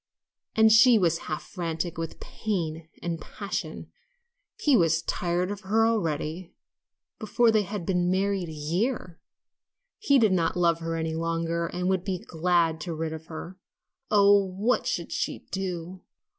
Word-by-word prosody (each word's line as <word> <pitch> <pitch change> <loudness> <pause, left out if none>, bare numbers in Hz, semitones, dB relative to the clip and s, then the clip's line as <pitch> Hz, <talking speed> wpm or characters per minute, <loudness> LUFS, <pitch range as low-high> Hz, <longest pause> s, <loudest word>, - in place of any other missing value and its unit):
And 220 -1 +6
she 225 +2 +7
was 170 -4 +2
half 155 - -3
frantic 170 -2 -4
with 165 0 -5
pain 165 -6 -4
and 170 -1 -3
passion. - - -5 0.7
He 290 -3 +4
was 165 -5 +3
tired 180 +2 -1
of 205 0 -6
her 215 +3 +2
already 170 -5 -2 0.6
before 225 +2 +3
they 215 -1 +3
had 200 -2 -5
been 180 -1 +1
married 190 -1 0
a - - -6
year 170 - -2 0.8
he 280 -10 +4
did 220 -5 +4
not 170 -1 +1
love 170 -1 +3
her 165 0 -3
any 160 0 -2
longer 165 +1 -1
and 180 +2 -3
would 190 -1 +1
be 190 -2 -2
glad 165 -2 0
to 170 0 -4
be - - -9
rid 160 -1 -2
of 160 0 -9
her. 170 +3 -8 0.5
Oh, 200 -1 +6
what 195 +6 0
should - - -2
she - - -3
do! 185 -1 -4
180 Hz, 160 wpm, -27 LUFS, 165-200 Hz, 0.8 s, she